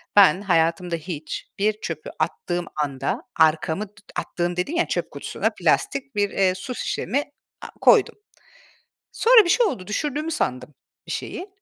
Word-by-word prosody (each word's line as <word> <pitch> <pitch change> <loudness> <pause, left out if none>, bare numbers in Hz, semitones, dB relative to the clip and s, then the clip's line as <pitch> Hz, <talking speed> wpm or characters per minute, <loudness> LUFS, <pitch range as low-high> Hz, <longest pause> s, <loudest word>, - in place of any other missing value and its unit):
ben 195 -2 +7
hayatımda 170 -1 +1
hiç 160 -1 -6
bir 210 +1 +3
çöpü 160 -2 -5
attığım 175 -1 -2
anda 150 - -2 0.2
arkamı 160 +5 +2
t 205 - -30 0.2
attığım 175 0 -2
dediğim 290 - -1
ya, - - +2
çöp - - -2
kutusuna - - -2
plastik 275 -4 0
bir, 205 -1 +2
eee, 185 -1 +2
su 250 +7 -6
şişemi 280 +4 -1 0.4
a - - -7
koydum. 455 -5 +5 1.0
Sonra 460 -3 +6
bir - - -2
şey 480 +2 +4
oldu, 185 - -3
düşürdüğümü 295 - -2
sandım 130 - -2 0.3
bir - - -5
şeyi. 375 +2 -5
190 Hz, 150 wpm, -23 LUFS, 165-275 Hz, 1.0 s, ben